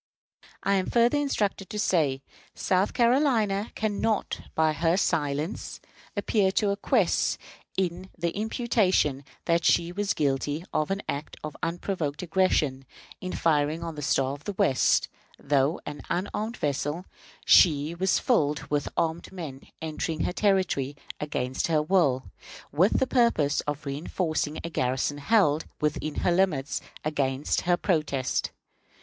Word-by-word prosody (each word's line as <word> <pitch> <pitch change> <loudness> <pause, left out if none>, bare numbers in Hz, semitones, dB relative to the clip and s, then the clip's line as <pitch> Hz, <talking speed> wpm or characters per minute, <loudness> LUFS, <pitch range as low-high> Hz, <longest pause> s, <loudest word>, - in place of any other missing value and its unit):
I 200 - +2
am 185 - -1
further 240 +4 +3
instructed 205 -9 -1
to 215 - -5
say 150 -10 +1 0.3
that - - -17
South 185 +1 +2
Carolina 235 -5 +2
can 210 -2 -1
not, 220 -2 0
by 160 -1 +3
her 165 +3 +1
silence, 155 -1 -1 0.4
appear 200 -1 +2
to 205 -1 +2
acquiesce 200 - +1 0.4
in 185 0 -2
the 170 0 -1
imputation 205 - +1 0.2
that 170 -1 +2
she 170 +1 +3
was 205 +2 -1
guilty 145 +2 -1
of 155 - 0
an 195 +1 -2
act 145 +2 -4
of 155 -1 -6
unprovoked 165 -2 -2
aggression 155 -7 +1 0.3
in 185 - -5
firing 155 0 +1
on 165 -1 -4
the 150 - -7
Star 135 -1 +1
of 145 +1 -10
the 205 - -3
West. 190 -10 +3 0.3
Though 140 +2 +1
an 145 - -6
unarmed 210 +5 -2
vessel, 145 +4 -2 0.4
she 150 -2 +5
was 190 +2 +1
filled 150 - +1
with 145 -1 0
armed 165 +1 -1
men 155 -8 -7 0.2
entering 160 0 -3
her - - 0
territory 185 -10 +1 0.2
against 130 -4 -2
her 155 -2 +2
will, 150 -7 +2 0.5
with 175 +9 +3
the - - +2
purpose 235 - +2
of 145 0 -3
reënforcing 155 +2 -2
a - - -3
garrison 130 +1 -1
held, 160 -3 +3
within 150 0 -1
her 180 - +4
limits, 170 -6 +1 0.2
against 140 -2 0
her 175 - +5
protest. 150 -8 0
165 Hz, 140 wpm, -27 LUFS, 145-195 Hz, 0.5 s, she